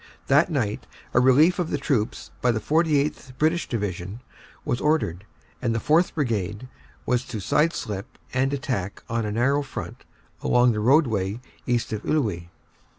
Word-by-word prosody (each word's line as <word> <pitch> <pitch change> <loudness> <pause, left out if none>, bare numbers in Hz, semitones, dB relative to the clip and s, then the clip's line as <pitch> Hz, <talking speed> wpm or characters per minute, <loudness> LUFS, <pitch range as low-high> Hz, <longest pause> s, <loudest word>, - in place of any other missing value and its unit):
That 150 +5 +4
night 115 -10 -2 0.3
a - - +5
relief 145 +8 +5
of 175 - -1
the - - 0
troops 110 - -1
by 125 - +3
the 110 - -1
49th. 150 -1 0
British 160 +3 +1
Division 100 -1 -3 0.4
was 120 - -1
ordered, 105 - 0 0.4
and 115 -2 0
the - - +1
4th. 160 +8 +2
Brigade 110 - -2 0.4
was 125 0 +1
to 115 -5 -5
side 155 - +2
slip 105 +5 -5 0.2
and 135 +1 +1
attack 125 -9 -3
on 115 -2 -1
a - - -2
narrow 135 +6 +2
front 140 - -7 0.4
along 125 0 +4
the 105 - -2
roadway 110 - +2 0.3
east 120 -2 0
of 105 - -3
Iwuy. 105 - -1
125 Hz, 155 wpm, -25 LUFS, 105-145 Hz, 0.4 s, a